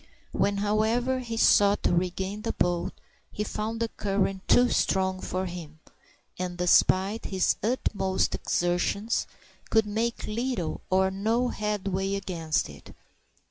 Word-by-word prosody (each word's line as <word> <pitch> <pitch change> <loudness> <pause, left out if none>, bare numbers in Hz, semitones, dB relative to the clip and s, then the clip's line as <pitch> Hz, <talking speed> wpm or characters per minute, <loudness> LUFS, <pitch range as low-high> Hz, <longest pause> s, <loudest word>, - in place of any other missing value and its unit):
When, 200 0 +1
however, 220 +5 +1
he 230 -2 -5
sought 205 -2 +4
to - - +2
regain 190 +3 -1
the - - -2
boat, 175 -1 0 0.4
he 210 - -3
found 220 +2 -3
the 230 - 0
current 195 -2 -2
too 245 0 +5
strong 190 -1 +1
for 185 +1 -2
him, 170 -4 -7 0.6
and 180 -1 -3
despite 190 +4 +3
his 190 -2 +1
utmost 200 -4 0
exertions, 180 +5 0 0.4
could 220 -1 +3
make 225 +3 -2
little 230 -5 -2
or 190 0 +3
no 225 +6 0
headway 195 -3 -2
against 170 -5 -1
it. 70 -2 -13
200 Hz, 130 wpm, -27 LUFS, 185-220 Hz, 0.6 s, too